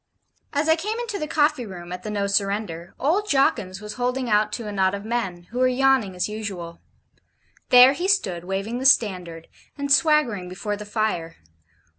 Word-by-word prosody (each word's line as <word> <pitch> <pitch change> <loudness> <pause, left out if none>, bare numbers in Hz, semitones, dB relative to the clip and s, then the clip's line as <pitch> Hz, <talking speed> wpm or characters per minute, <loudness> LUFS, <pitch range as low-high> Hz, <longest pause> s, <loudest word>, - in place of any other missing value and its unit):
As 295 +2 0
I 320 - +5
came 420 +7 -3
into 465 -4 -4
the 305 - -3
coffee 300 -4 +1
room 175 -2 -9
at 180 0 -6
the 215 - -6
'No 205 -1 -1
Surrender,' 200 -4 -2
old 390 +9 0
Jawkins 200 -9 +1
was 210 0 -7
holding 250 -1 -1
out 210 0 +3
to 235 - -4
a - - -4
knot 190 -1 +1
of 200 +1 -8
men, 195 -7 -3
who 245 - -4
were 255 - +4
yawning, 255 -6 +2
as 180 - -1
usual. 195 -6 -6 0.9
There 250 +2 +8
he 350 +6 -2
stood, 195 - +1
waving 195 +6 -3
the 265 - +3
STANDARD, 180 -10 +1 0.3
and 280 0 -3
swaggering 275 - +3
before 200 +3 -4
the 210 0 -8
fire. 205 -7 -2
215 Hz, 185 wpm, -23 LUFS, 190-270 Hz, 0.9 s, There